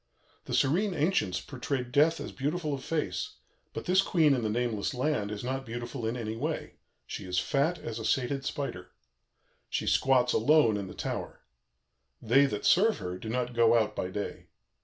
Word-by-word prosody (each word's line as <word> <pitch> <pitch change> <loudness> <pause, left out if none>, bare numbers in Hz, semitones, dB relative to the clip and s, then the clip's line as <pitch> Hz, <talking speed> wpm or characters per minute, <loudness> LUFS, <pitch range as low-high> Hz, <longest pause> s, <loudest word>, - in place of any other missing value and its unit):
The - - -2
serene 180 +8 +2
ancients 145 - +1
portrayed 130 -2 -4
Death 155 +5 +4
as - - -6
beautiful 150 +2 -2
of 135 - -5
face; 160 -2 -2 0.4
but - - -6
this 185 +2 +4
Queen 160 -6 +3
in 130 - 0
the 110 - -1
nameless 120 +2 -1
land 125 -6 0
is 105 +1 -5
not 135 +2 -2
beautiful 120 0 -5
in 115 +2 -2
any 110 -2 -4
way; 150 +7 -4 0.3
she - - -6
is 90 0 -3
fat 145 - +1
as 115 -7 -6
a - - -5
sated 135 +3 0
spider. 120 -11 -4 0.8
She - - -2
squats 125 -2 +3
alone 120 -2 +4
in 100 -2 -3
the - - -10
tower. - - -4 0.8
They 135 +5 +4
that 105 -6 -4
serve 215 +5 +5
her 90 -2 -5
do 110 - -6
not 125 +1 -1
go 115 0 +5
out 105 -2 0
by 90 - -2
day. 100 +2 -5
125 Hz, 180 wpm, -29 LUFS, 110-150 Hz, 0.8 s, serve